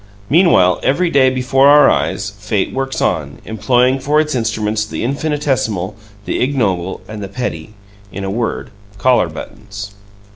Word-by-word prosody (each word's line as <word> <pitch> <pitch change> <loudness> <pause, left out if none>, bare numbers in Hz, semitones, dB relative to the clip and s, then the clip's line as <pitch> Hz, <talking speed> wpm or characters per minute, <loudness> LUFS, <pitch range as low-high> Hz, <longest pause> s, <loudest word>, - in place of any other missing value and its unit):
Meanwhile, 145 - +4
every 170 +6 +1
day 130 -2 +4
before 130 +1 +2
our 145 +1 +7
eyes, 95 0 0
fate 105 0 -2
works 135 0 -3
on, 70 -5 -1
employing 125 +4 +1
for 145 +3 +1
its 155 -1 0
instruments 110 -3 -1
the 105 - -5
infinitesimal, 135 - -1 0.3
the - - -2
ignoble 100 -10 -1
and 110 -1 -7
the 100 - -5
petty 105 -4 -5 0.4
in 100 - -6
a 95 - -3
word, 115 +2 -3 0.3
collar 120 -4 +3
buttons. 100 +5 -9
115 Hz, 145 wpm, -16 LUFS, 100-135 Hz, 0.4 s, our